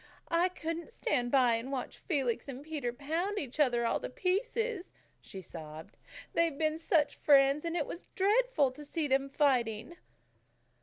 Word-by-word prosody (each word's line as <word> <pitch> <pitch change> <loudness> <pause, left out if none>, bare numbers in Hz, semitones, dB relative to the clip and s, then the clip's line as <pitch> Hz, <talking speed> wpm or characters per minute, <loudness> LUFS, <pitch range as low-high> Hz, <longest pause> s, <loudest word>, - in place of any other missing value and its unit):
"I 340 +2 +3
couldn't 330 0 -5
stand 255 - -1
by 250 -3 +4
and 245 +4 -6
watch 260 -3 -4
Felix 270 - -1
and 270 0 -7
Peter 295 -6 -3
pound 325 +10 -2
each 280 -4 -4
other 245 -5 +3
all - - +1
to - - -5
pieces," 410 - -1 0.3
she 190 -3 -9
sobbed. 155 -2 -9 0.4
"They've 330 -4 +1
been 310 +1 0
such 320 -2 +1
friends, 280 +1 +4
and 335 +1 -1
it 300 - 0
was 345 - -8
dreadful 405 - +3
to 295 +4 -11
see 300 +1 -2
them 270 0 +1
fighting." 255 0 +1
295 Hz, 160 wpm, -32 LUFS, 255-340 Hz, 0.4 s, by